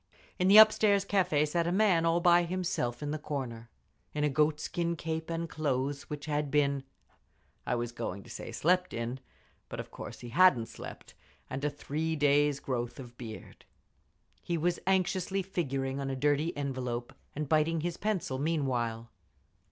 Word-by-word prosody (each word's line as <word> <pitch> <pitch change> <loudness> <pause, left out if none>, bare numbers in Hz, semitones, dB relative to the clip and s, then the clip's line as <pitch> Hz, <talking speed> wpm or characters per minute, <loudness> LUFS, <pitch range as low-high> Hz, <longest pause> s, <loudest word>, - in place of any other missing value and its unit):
In 180 - +3
the 200 +2 +8
upstairs 215 -2 +7
cafe 180 -7 +2
sat 170 +2 0
a - - +1
man 185 -4 +3
all 165 +1 +3
by 175 0 +6
himself 170 -8 -2
in 145 - -2
the 155 - -3
corner, 120 -6 -5 0.5
in 150 - 0
a 150 - +3
goat 150 +1 +2
skin 170 +2 -2
cape 160 0 -4
and 165 0 -2
clothes 140 -3 -2
which 150 -1 -5
had 150 -1 -1
been—I 140 -3 -3
was 120 0 -2
going 100 -4 -5
to - - -15
say - - -7
"slept 180 +3 +1
in," 115 +3 -3 0.5
but - - -6
of - - -7
course - - -8
he 120 - -7
hadn't 135 -5 +4
slept—and 135 +2 -10
a 150 - +2
three 155 +3 -3
days' 145 -1 +3
growth 120 -1 -3
of 120 -2 -10
beard. 115 -3 -9 0.8
He 170 - -2
was 175 +2 0
anxiously 190 0 +1
figuring 135 -7 -2
on 135 -1 -3
a 135 - -2
dirty 145 +4 +1
envelope, 125 -4 -3 0.2
and 150 0 -3
biting 155 +2 +2
his 175 +1 -3
pencil 190 -11 -1
meanwhile. 125 -7 -1
150 Hz, 165 wpm, -30 LUFS, 135-170 Hz, 0.8 s, the